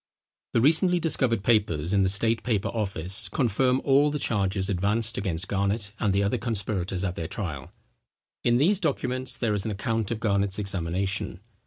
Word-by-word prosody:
The 115 Hz, -, +3 dB
recently 165 Hz, +6 st, +4 dB
discovered 130 Hz, -, +1 dB
papers 100 Hz, -7 st, +1 dB
in 100 Hz, -, +3 dB
the 95 Hz, -, +2 dB
State 110 Hz, +4 st, +2 dB
Paper 110 Hz, -5 st, -1 dB
Office, 95 Hz, -4 st, -1 dB
confirm 125 Hz, +1 st, +1 dB
all 140 Hz, +2 st, +4 dB
the 150 Hz, -, -2 dB
charges 100 Hz, -6 st, 0 dB
advanced 105 Hz, +4 st, +1 dB
against 95 Hz, -2 st, -2 dB
Garnet 100 Hz, +1 st, -1 dB
and 105 Hz, -3 st, +1 dB
the 100 Hz, +1 st, +1 dB
other 100 Hz, -, 0 dB
conspirators 95 Hz, -5 st, -2 dB
at 90 Hz, -3 st, -1 dB
their 80 Hz, -, -4 dB
trial. 80 Hz, -8 st, -5 dB, 0.7 s
In 120 Hz, 0 st, +3 dB
these 180 Hz, +9 st, +3 dB
documents 130 Hz, -6 st, -1 dB
there 115 Hz, -3 st, 0 dB
is 100 Hz, -2 st, +1 dB
an 110 Hz, -, -2 dB
account 110 Hz, +1 st, -2 dB
of 115 Hz, -2 st, -3 dB
Garnet's 100 Hz, -3 st, 0 dB
examination. 95 Hz, 0 st, -2 dB
105 Hz, 170 wpm, -26 LUFS, 95-120 Hz, 0.7 s, recently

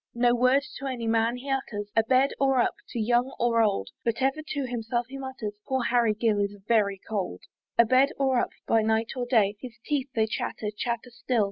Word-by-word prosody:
No 240 Hz, 0 st, +3 dB
word 255 Hz, +3 st, +3 dB, 0.2 s
to 275 Hz, -, -4 dB
any 245 Hz, -3 st, -3 dB
man 225 Hz, +1 st, +2 dB
he 270 Hz, +2 st, -6 dB
utters, 205 Hz, -6 st, -3 dB
A 225 Hz, -, +6 dB
bed 260 Hz, +4 st, +3 dB
or 270 Hz, -1 st, +3 dB
up, 240 Hz, -, +2 dB, 0.2 s
to 235 Hz, -, -4 dB
young 240 Hz, +4 st, +1 dB
or 235 Hz, -1 st, +3 dB
old; 210 Hz, -3 st, +1 dB
But 230 Hz, 0 st, -1 dB
ever 270 Hz, +3 st, +1 dB
to 285 Hz, -3 st, -3 dB
himself 240 Hz, 0 st, -2 dB
he 275 Hz, 0 st, -7 dB
mutters, 260 Hz, -6 st, -5 dB
"Poor 265 Hz, -2 st, 0 dB
Harry 235 Hz, -3 st, +2 dB
Gill 220 Hz, -1 st, +1 dB
is 200 Hz, 0 st, -1 dB
very 205 Hz, -4 st, +2 dB
cold." 195 Hz, -, -3 dB, 0.4 s
A 235 Hz, -, +7 dB
bed 260 Hz, +4 st, +4 dB
or 265 Hz, -2 st, +2 dB
up, -, -, 0 dB, 0.2 s
by 225 Hz, -, +3 dB
night 220 Hz, +1 st, +1 dB
or 245 Hz, -1 st, -3 dB
day; 210 Hz, -4 st, +3 dB
His 245 Hz, -3 st, -9 dB
teeth 285 Hz, -2 st, -1 dB
they 220 Hz, -1 st, +3 dB
chatter, 215 Hz, -1 st, -3 dB
chatter 235 Hz, +2 st, -3 dB
still. 240 Hz, 0 st, -1 dB
240 Hz, 215 wpm, -27 LUFS, 220-260 Hz, 0.4 s, A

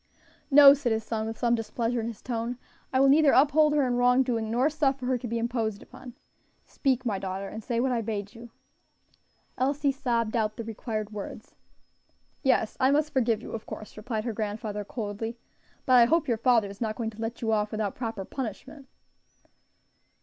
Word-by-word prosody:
"No," 280 Hz, -1 st, +9 dB
said 280 Hz, -4 st, -1 dB
his 220 Hz, 0 st, 0 dB
son, 220 Hz, 0 st, -3 dB
with 225 Hz, 0 st, -5 dB
some 235 Hz, -1 st, +1 dB
displeasure 235 Hz, +1 st, -1 dB
in 225 Hz, -, -4 dB
his 230 Hz, -3 st, -8 dB
tone; 235 Hz, 0 st, -3 dB, 0.3 s
"I 260 Hz, -, +2 dB
will 275 Hz, -, +5 dB
neither 290 Hz, +1 st, +5 dB
uphold 300 Hz, +2 st, +4 dB
her 290 Hz, -2 st, +3 dB
in 245 Hz, -1 st, 0 dB
wrongdoing, 245 Hz, -2 st, +2 dB
nor 245 Hz, +5 st, +2 dB
suffer 275 Hz, -4 st, 0 dB
her 255 Hz, 0 st, +1 dB
to 245 Hz, -, -6 dB
be 235 Hz, +1 st, -2 dB
imposed 230 Hz, -3 st, -2 dB
upon. 250 Hz, -1 st, -12 dB, 0.5 s
Speak, 260 Hz, -3 st, -1 dB
my 205 Hz, -5 st, -1 dB
daughter, 190 Hz, +1 st, -4 dB
and 220 Hz, +2 st, -8 dB
say 235 Hz, 0 st, -1 dB
what 260 Hz, +2 st, +1 dB
I 240 Hz, -2 st, 0 dB
bade 210 Hz, -2 st, -4 dB
you." 235 Hz, 0 st, -11 dB, 1.1 s
Elsie 280 Hz, +2 st, +1 dB
sobbed 240 Hz, -5 st, -1 dB
out 215 Hz, -2 st, 0 dB
the 230 Hz, -, -4 dB
required 220 Hz, -1 st, -5 dB
words. 210 Hz, -2 st, -8 dB, 0.9 s
"Yes, 255 Hz, -5 st, +1 dB
I 260 Hz, -1 st, +4 dB
must 300 Hz, +1 st, +1 dB
forgive 235 Hz, -4 st, +1 dB
you, -, -, -8 dB
of 225 Hz, -, -6 dB
course," 215 Hz, -, -9 dB
replied 220 Hz, 0 st, -4 dB
her 235 Hz, -1 st, -3 dB
grandfather, 210 Hz, 0 st, -4 dB
coldly, 225 Hz, +2 st, -5 dB, 0.5 s
"but 255 Hz, -, +2 dB
I 235 Hz, -, +7 dB
hope 330 Hz, +6 st, +2 dB
your 235 Hz, -3 st, +1 dB
father 230 Hz, -2 st, +3 dB
is 200 Hz, +3 st, -12 dB
not 215 Hz, -2 st, -1 dB
going 225 Hz, -1 st, -3 dB
to 220 Hz, +1 st, -11 dB
let 230 Hz, +1 st, -4 dB
you 225 Hz, -, +1 dB
off 210 Hz, -1 st, +1 dB
without 215 Hz, -2 st, -2 dB
proper 225 Hz, -5 st, -5 dB
punishment." 270 Hz, +4 st, -7 dB
235 Hz, 195 wpm, -27 LUFS, 220-260 Hz, 1.1 s, No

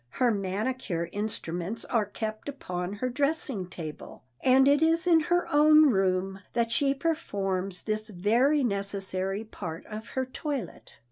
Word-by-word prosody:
Her 245 Hz, -, +2 dB
manicure 195 Hz, -3 st, -2 dB
instruments 205 Hz, 0 st, -3 dB
are 220 Hz, -4 st, 0 dB
kept 215 Hz, +4 st, -5 dB
upon 180 Hz, -9 st, -4 dB
her 255 Hz, +5 st, -2 dB
dressing 275 Hz, -, -1 dB
table, 160 Hz, -4 st, -8 dB, 0.2 s
and 265 Hz, +1 st, +5 dB
it 285 Hz, +1 st, +4 dB
is 330 Hz, +2 st, +3 dB
in 340 Hz, -2 st, +6 dB
her 350 Hz, +3 st, +1 dB
own 305 Hz, 0 st, +7 dB
room 190 Hz, -1 st, 0 dB
that 235 Hz, -1 st, +1 dB
she 275 Hz, +4 st, +2 dB
performs 195 Hz, -, -2 dB
this 215 Hz, 0 st, -2 dB
very 235 Hz, +10 st, +2 dB
necessary 195 Hz, -2 st, -1 dB
part 165 Hz, -6 st, -7 dB
of 215 Hz, +1 st, -7 dB
her 260 Hz, -, +1 dB
toilet. 260 Hz, -, -5 dB
220 Hz, 140 wpm, -28 LUFS, 195-275 Hz, 0.2 s, own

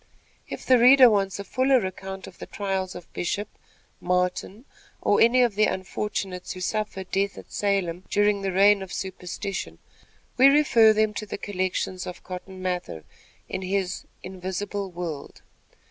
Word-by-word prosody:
If -, -, -7 dB
the 255 Hz, -1 st, +5 dB
reader 255 Hz, 0 st, +8 dB
wants 195 Hz, -2 st, 0 dB
a 200 Hz, -, -5 dB
fuller 255 Hz, +2 st, +2 dB
account 190 Hz, 0 st, -6 dB
of 185 Hz, -, -14 dB
the -, -, -8 dB
trials 190 Hz, -2 st, -3 dB
of 175 Hz, -, -11 dB
Bishop, 205 Hz, +4 st, -2 dB, 0.5 s
Martin 180 Hz, +5 st, -1 dB, 0.3 s
or 205 Hz, -, +2 dB
any 250 Hz, +2 st, +5 dB
of 235 Hz, -3 st, +1 dB
the 215 Hz, +1 st, +3 dB
unfortunates 190 Hz, -1 st, -3 dB
who 185 Hz, -, -9 dB
suffered 195 Hz, -1 st, -3 dB
death 195 Hz, +1 st, 0 dB
at -, -, -12 dB
Salem 190 Hz, -3 st, -1 dB
during 205 Hz, 0 st, +2 dB
the 195 Hz, -1 st, -1 dB
reign 200 Hz, +2 st, +5 dB
of 190 Hz, -2 st, -7 dB
superstition, 190 Hz, +1 st, -5 dB, 0.6 s
we 260 Hz, +2 st, +8 dB
refer 275 Hz, -6 st, +6 dB
them 215 Hz, 0 st, +2 dB
to 215 Hz, 0 st, -5 dB
the -, -, -5 dB
collections 185 Hz, -2 st, -3 dB
of 180 Hz, -, -8 dB
Cotton 185 Hz, +1 st, -8 dB
Mather 180 Hz, -, -3 dB, 0.4 s
in -, -, -4 dB
his 190 Hz, -1 st, -2 dB, 0.2 s
"Invisible 190 Hz, +2 st, -4 dB
World." 170 Hz, -5 st, -7 dB
195 Hz, 155 wpm, -25 LUFS, 185-210 Hz, 0.6 s, reader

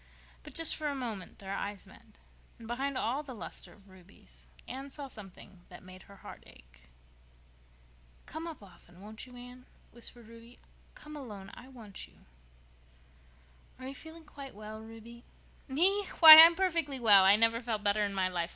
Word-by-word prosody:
But -, -, -13 dB
just 330 Hz, -1 st, 0 dB
for 305 Hz, -, -5 dB
a 285 Hz, -, -3 dB
moment 225 Hz, -8 st, -7 dB
their 195 Hz, 0 st, -8 dB
eyes 200 Hz, 0 st, -6 dB
met, -, -, -20 dB, 0.4 s
and, 225 Hz, -, -13 dB
behind 265 Hz, +3 st, -4 dB
all 255 Hz, +4 st, -2 dB
the 270 Hz, -4 st, -10 dB
luster 185 Hz, -, -10 dB
of 200 Hz, -1 st, -21 dB
Ruby's, 175 Hz, -, -17 dB, 0.2 s
Anne 270 Hz, +2 st, -8 dB
saw 280 Hz, 0 st, -8 dB
something 195 Hz, -5 st, -12 dB
that 180 Hz, -, -14 dB
made 185 Hz, 0 st, -14 dB
her 200 Hz, -, -14 dB
heart -, -, -11 dB
ache. -, -, -21 dB, 1.4 s
"Come 320 Hz, +2 st, -8 dB
up 320 Hz, -10 st, -10 dB
often, 180 Hz, -2 st, -19 dB
won't 215 Hz, +4 st, -11 dB
you, 250 Hz, -, -15 dB
Anne?" 245 Hz, +1 st, -13 dB, 0.2 s
whispered 235 Hz, -1 st, -8 dB
Ruby. 230 Hz, +1 st, -16 dB, 0.4 s
"Come 300 Hz, 0 st, -12 dB
alone—I 215 Hz, -4 st, -11 dB
want 225 Hz, -7 st, -11 dB
you." -, -, -26 dB, 1.6 s
"Are 255 Hz, -, -11 dB
you 270 Hz, -, -7 dB
feeling 320 Hz, +3 st, -13 dB
quite 280 Hz, -4 st, -11 dB
well, 215 Hz, +1 st, -10 dB
Ruby?" 225 Hz, +2 st, -13 dB, 0.4 s
"Me! 370 Hz, +9 st, +1 dB, 0.2 s
Why, 315 Hz, -2 st, +13 dB
I'm 330 Hz, +1 st, +9 dB
perfectly 335 Hz, -7 st, -1 dB
well. 205 Hz, -5 st, +6 dB
I 195 Hz, +2 st, +6 dB
never 230 Hz, +2 st, +1 dB
felt 225 Hz, -4 st, -4 dB
better 205 Hz, +1 st, +1 dB
in 200 Hz, -1 st, -4 dB
my 190 Hz, -1 st, 0 dB
life. 175 Hz, -2 st, -4 dB
230 Hz, 170 wpm, -30 LUFS, 200-275 Hz, 1.6 s, Why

